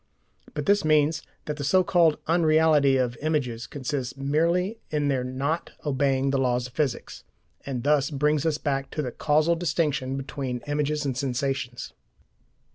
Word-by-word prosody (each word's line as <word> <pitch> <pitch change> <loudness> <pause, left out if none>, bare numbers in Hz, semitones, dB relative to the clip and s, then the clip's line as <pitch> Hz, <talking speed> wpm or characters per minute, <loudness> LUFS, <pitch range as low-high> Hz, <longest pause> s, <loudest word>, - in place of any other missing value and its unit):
But - - -3
this 200 0 +3
means 155 0 +3 0.2
that 150 -1 -4
the 145 - -4
so 185 +6 +4
called 170 -4 +3
"unreality" 155 -4 +4
of 125 -2 0
images 135 -7 -1
consists 135 -2 -4
merely 170 +9 0
in 150 -2 0
their 130 -2 0
not 135 +6 -3
obeying 135 -1 +1
the 135 - +1
laws 125 -1 +1
of 125 - -10
physics, 140 -5 -3 0.4
and 125 -4 -3
thus 145 -1 +2
brings 150 0 +1
us 160 -2 +1
back 135 -3 -2
to 150 - -3
the 125 - -3
causal 155 +5 +2
distinction 145 -5 -1
between 135 -2 -4
images 150 0 -1
and 135 -3 -1
sensations. 130 -1 -3
145 Hz, 155 wpm, -26 LUFS, 130-155 Hz, 0.4 s, so